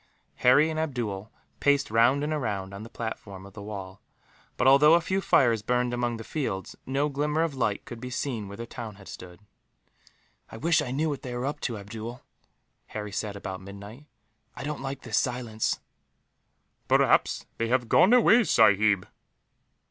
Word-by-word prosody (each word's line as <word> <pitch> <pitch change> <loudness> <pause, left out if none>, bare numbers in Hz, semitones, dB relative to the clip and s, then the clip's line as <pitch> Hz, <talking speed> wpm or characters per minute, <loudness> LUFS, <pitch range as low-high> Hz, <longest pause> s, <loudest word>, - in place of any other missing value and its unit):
Harry 145 +6 +5
and 155 - -3
Abdool 115 -9 -3 0.3
paced 145 0 +2
round 120 +6 +4
and 150 0 -1
round 100 -4 -3
on 100 - -7
the 115 - -9
platform 100 -5 -6
of 100 - -13
the 105 - -9
wall 100 -2 -7 0.6
but, 125 - +1
although 145 +4 +7
a - - +5
few 190 +3 -1
fires 120 - +3
burned 125 +2 0
among 120 -1 -1
the 115 - -7
fields, 100 - -4
no 140 +3 +1
glimmer 150 +2 0
of 165 -3 -1
light 115 -6 -1
could 120 - -8
be 125 - -5
seen 125 -5 -3
where 100 +1 -9
the 115 - -5
town 115 -2 -8
had 95 -1 -15
stood. 90 0 -10 1.1
"I - - -8
wish 165 +6 +2
I - - -4
knew 145 +5 0
what 145 -3 -3
they 125 -1 -6
were 120 +1 -2
up 145 +2 -3
to, 115 -4 -3
Abdool," 110 +4 -8 0.6
Harry 105 -1 -6
said, 100 0 -3
about 95 -1 -6
midnight. 100 +8 -11 0.5
"I - - -7
don't 150 0 -4
like 135 0 -5
this 115 -4 0
silence." 120 -3 -1 1.1
"Perhaps - - +3
they 115 - 0
have 120 0 +1
gone 185 - +5
away, 245 -1 +6
sahib." 105 - +4
120 Hz, 180 wpm, -27 LUFS, 105-140 Hz, 1.1 s, although